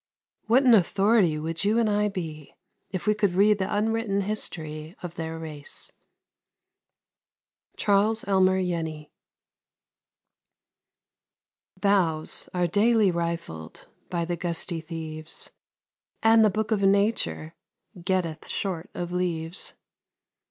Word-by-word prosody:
What 245 +5 +5
an 250 -3 +6
authority 195 -3 +4
would 165 +4 -3
you 210 +3 +2
and 230 -1 +3
I 210 0 +2
be 160 -6 -7 0.3
if 185 -2 -4
we 210 - +4
could 205 -4 0
read 205 +2 +4
the 190 +1 -2
unwritten 215 -1 0
history 160 -5 -4
of 175 -2 -5
their 165 -1 -5
race! 155 -3 -4 1.9
Charles 210 +2 +2
Elmer 190 -1 +3
Jenny. 160 -4 -4 2.7
Boughs 180 -6 +1
are 180 -1 +1
daily 210 +3 +3
rifled 170 - -5 0.2
By 170 -2 -1
the 175 +1 -2
gusty 170 0 -3
thieves, 160 -1 -7 0.7
And 225 0 +6
the 215 - +5
Book 215 +3 -2
of 210 -2 +2
Nature 200 -5 +1 0.5
Getteth 175 -4 -1
short 180 -4 -3
of 175 0 -4
leaves. 175 -1 -3
180 Hz, 110 wpm, -26 LUFS, 165-205 Hz, 2.7 s, an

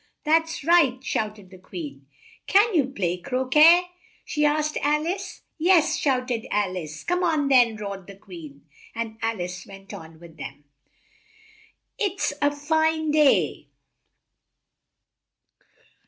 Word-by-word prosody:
"That's 325 0 +1
right!" 320 -6 +4
shouted 210 -6 -4
the 185 - -13
Queen. 145 -7 -9 0.4
"Can 415 +3 +4
you 295 -7 +2
play 180 -9 -2
cro 255 +6 -3
quet?" 320 +6 +7 0.4
she 300 - -1
asked 300 +1 +1
Al 300 +2 0
ice. 380 +2 -5 0.2
"Yes," 330 -1 +4
shouted 255 -7 -1
Al 200 -3 0
ice. 155 -4 -7
"Come 360 +1 -1
on 310 -5 +1
then!" 245 -4 +5
roared 200 -3 -7
the 200 - -11
Queen, 165 -8 -12 0.3
and 225 -1 -5
Al 225 -2 -2
ice 180 0 -5
went 195 0 -12
on 160 0 -11
with 165 -1 -15
them. 145 0 -9 1.4
"It's 400 -3 -1
it's - - -13
a 290 - +4
fine 315 +1 0
day!" 300 -2 +2
260 Hz, 135 wpm, -24 LUFS, 195-315 Hz, 1.4 s, quet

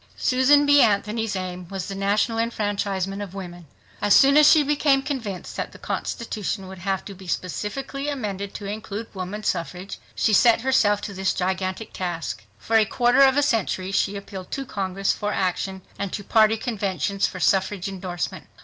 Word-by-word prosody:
Susan 280 +3 +4
B. 285 0 +6
Anthony's 210 +1 +1
aim 180 -1 -5
was 190 0 -5
the 195 - -5
national 205 +4 +1
enfranchisement 205 -3 -1
of 195 -2 -7
women. 175 -3 -8 0.3
As 205 -1 +5
soon 275 0 +6
as 300 0 +8
she 310 -2 +6
became 285 -1 +2
convinced 225 - -5
that - - -4
the - - -11
constitution 210 -4 -4
would 190 0 -9
have 190 +1 -2
to 200 - -7
be 190 -1 -13
specifically 270 - -3
amended 200 -8 -4
to 205 - -6
include 215 +1 -6
woman 190 +2 -5
suffrage, 180 0 -3 0.2
she 220 - +2
set 230 +2 +5
herself 215 -6 +3
to 205 - -6
this 190 0 -1
gigantic 185 +3 -2
task. 175 -9 -4
For 225 - +1
a 220 - +5
quarter 245 +4 +3
of 270 0 +6
a 290 - +4
century 195 -7 0
she 195 +1 +1
appealed 195 -2 -8
to 275 - -3
Congress 195 -5 -1
for 210 0 -3
action 190 0 -2 0.2
and 200 -2 -3
to 205 - -4
party. 220 +1 +4
conventions 200 -4 -1
for 185 - -7
suffrage 190 +2 +1
endorsement. 180 -5 -5
200 Hz, 175 wpm, -24 LUFS, 190-230 Hz, 0.3 s, as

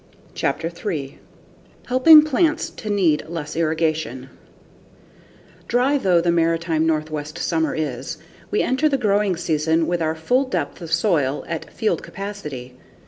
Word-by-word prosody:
Chapter 165 - -1
3 165 -5 -5 0.7
Helping 300 +5 +7
Plants 310 +2 +1
to 215 - -8
Need 180 -7 +2
Less 165 -3 -5
Irrigation 155 -5 -1 1.4
Dry 260 +4 +2
though 185 -7 +3
the 170 0 +1
maritime 165 -1 +1
Northwest 155 0 -2
summer 160 -1 0
is, 135 -5 -4 0.3
we 210 - +1
enter 265 +5 +1
the 275 - +1
growing 205 -5 +1
season 160 0 +1
with 175 0 -1
our 160 0 0
full 250 +12 +1
depth 175 - -3
of 165 -2 -8
soil 165 -6 +1
at 165 - -5
field 220 -2 -1
capacity. 150 -11 -7
165 Hz, 135 wpm, -21 LUFS, 155-205 Hz, 1.4 s, Helping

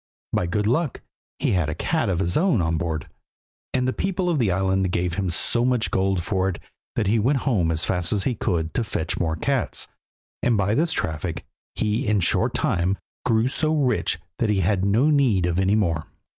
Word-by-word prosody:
By 90 - +1
good 105 +4 -1
luck 135 +5 0 0.4
he - - 0
had 90 -6 +1
a 75 - -3
cat 160 -10 0
of 90 - 0
his 90 -1 0
own 170 - +3
on 80 -1 +1
board, 80 -2 -3 0.6
and 125 0 0
the 130 - 0
people 185 -2 -1
of 155 - 0
the 115 -5 +2
island 95 0 +1
gave 90 0 -1
him 95 0 -1
so 120 +7 +2
much 125 -2 +1
gold 95 -2 +1
for 95 -1 0
it 90 - -4 0.4
that 110 - 0
he 110 +4 +2
went 130 +5 +2
home 100 - +2
as 80 -1 0
fast 90 -1 0
as 100 -3 +1
he 125 - 0
could 85 -7 -1
to 120 - 0
fetch 80 -6 -3
more 80 -2 0
cats, 80 - -1 0.5
and 120 -3 +2
by 100 +1 +1
this 160 +6 +2
traffic 80 - -3 0.3
he 110 +1 -1
in 105 0 +3
a - - +1
short 85 - +1
time 90 +3 +1 0.3
grew 115 0 +3
so 155 +4 +1
rich 125 - +1 0.2
that 115 - +1
he 100 -2 +2
had 95 +1 +1
no 115 +10 +3
need 125 -11 +3
of 90 0 0
any 95 +2 +3
more. 85 -7 0
100 Hz, 210 wpm, -23 LUFS, 90-120 Hz, 0.6 s, own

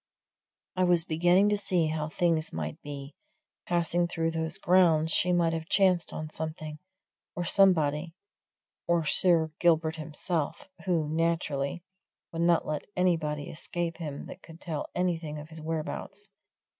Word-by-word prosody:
I 185 - +2
was 175 -2 +4
beginning 175 +5 +3
to 210 - +2
see 180 -4 +1
how 155 0 -2
things 165 -1 0
might 80 -1 -5
be 140 -1 -8 0.5
passing 175 0 +1
through 165 -1 -1
those 160 0 -2
grounds 165 -3 +4
she 180 - +3
might 170 -2 +2
have 160 0 -4
chanced 185 -3 +3
on 155 0 -6
something, 155 -1 -6 0.6
or 175 -2 -2
somebody, 165 -4 +3 0.7
or 170 -2 +2
Sir 160 0 +3
Gilbert 160 -2 +2
himself, 160 - -3 0.2
who, 165 -4 +1
naturally, 160 -1 -1 0.5
would 165 - -3
not 170 -1 +3
let 150 -1 -3
anybody 160 -5 0
escape 170 +1 -3
him 150 -4 -6
that - - -10
could 165 0 -13
tell 160 -5 -4
anything 165 -4 -1
of 150 +1 -9
his 160 -1 -10
whereabouts. 165 +5 -5
165 Hz, 145 wpm, -28 LUFS, 155-175 Hz, 0.7 s, was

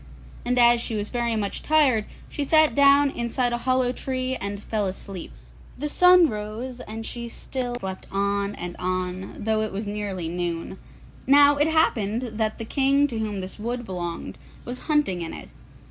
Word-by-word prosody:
And 250 +1 0
as 240 -1 +6
she 230 - -3
was 210 0 -3
very 235 -2 -1
much 205 -2 -2
tired 275 -9 +3 0.2
she 290 - -3
sat 310 +2 +4
down 280 0 +5
inside 240 0 -1
a 240 - -1
hollow 255 -1 +3
tree 255 0 -2
and 200 -3 -5
fell 210 -1 -2
asleep. 190 -1 -7 0.5
The 295 +3 -3
sun 360 +2 +6
rose 220 +3 -5
and 225 -1 -7
she 235 0 -6
still 245 +1 -4
slept 190 -5 -6
on 200 +1 0
and 175 0 -6
on, 185 +1 -3
although 220 0 0
it 215 - -2
was 205 +3 -4
nearly 205 -4 -3
noon. 175 +1 -3 0.5
Now, 285 +1 +7
it 295 +2 +3
happened 240 -8 +1 0.2
that 215 -1 0
the 225 - -5
king 275 +4 +3
to 230 -3 -4
whom 210 -3 -2
this 185 +3 -7
wood 240 +2 -3
belonged 175 -3 -5 0.3
was 245 +1 -5
hunting 295 - +2
in 165 - -5
it. - - -10
225 Hz, 175 wpm, -25 LUFS, 200-260 Hz, 0.5 s, Now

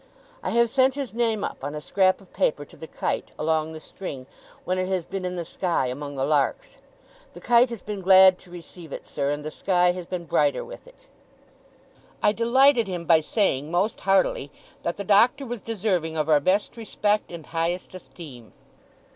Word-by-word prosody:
I - - -3
have 235 0 +3
sent 265 -1 +3
his 275 -5 -5
name 225 -3 0
up, - - -5
on 145 +2 -4
a - - -4
scrap 185 +5 +1
of 190 - -21
paper, 145 -1 0
to - - -17
the 160 - -10
kite, - - -3
along 160 0 0
the 160 - -8
string, 145 -6 -8 0.4
when 185 +1 -1
it 185 - -1
has 185 -3 -1
been 195 -1 -5
in 180 0 -3
the 170 -1 -4
sky, 170 -4 -1
among 145 +2 -6
the 135 0 -1
larks. 150 - -1 0.5
The - - -11
kite 240 +1 +4
has 235 -6 -7
been 205 -2 -5
glad 190 0 +7
to 180 - -18
receive 175 -2 -12
it, - - -7
sir, 140 - -2
and 145 +1 -3
the 155 - -4
sky 180 +1 +2
has 180 -1 -7
been 180 -2 -5
brighter 145 -2 +1
with - - -12
it.' - - -20 1.2
I - - +5
delighted 235 +1 +3
him 175 -3 -5
by 165 -1 +5
saying, 155 - 0
most 185 +6 -1
heartily, 190 -7 +1 0.3
that 170 - -3
the 200 - -4
Doctor 235 +8 +3
was 240 -3 -6
deserving 185 -7 -2
of 155 -1 0
our 150 -1 +5
best 195 +10 0
respect 210 -3 -1
and 170 -3 -8
highest 170 +3 -3
esteem. 145 -10 -12
180 Hz, 195 wpm, -24 LUFS, 160-210 Hz, 1.2 s, glad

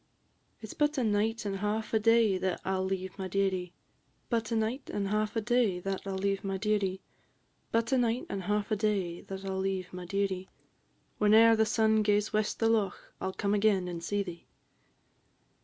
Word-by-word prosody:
"It 220 - -8
's - - -8
but 295 0 +1
a 255 - +1
night 215 +1 0
and 195 -1 -2
hauf 210 +3 -2
a 220 - +4
day 225 -3 +4
that 185 -1 -1
I 190 - 0
'll 190 0 0
leave 190 -1 -3
my 190 - -3
dearie; 185 -2 0 0.6
But 230 -2 0
a - - +1
night 225 +5 -2
and 200 -1 -2
hauf 215 +1 0
a 225 - +1
day 225 -5 +2
that 195 +1 -4
I - - -2
'll 190 - -2
leave 195 0 -1
my 195 -1 -2
dearie; 195 -2 0 0.7
But 230 +2 +1
a 265 - +4
night 240 +1 0
and 195 - -4
hauf 210 +2 -1
a - - +3
day 195 -5 -1
that 195 0 -8
I - - -3
'll 190 - -2
leave 190 -1 -2
my 180 0 -6
dearie; 195 -1 -1 0.7
Whene'er 220 +2 +6
the 220 0 +2
sun 220 0 +3
gaes 210 0 +1
west 215 0 0
the 225 - +2
loch, 220 -3 0
I - - -1
'll 190 - -3
come 200 +1 -1
again 200 -3 +2
and 170 -1 -5
see 205 +2 0
thee." 175 -3 -9
205 Hz, 210 wpm, -30 LUFS, 190-220 Hz, 0.7 s, Whene'er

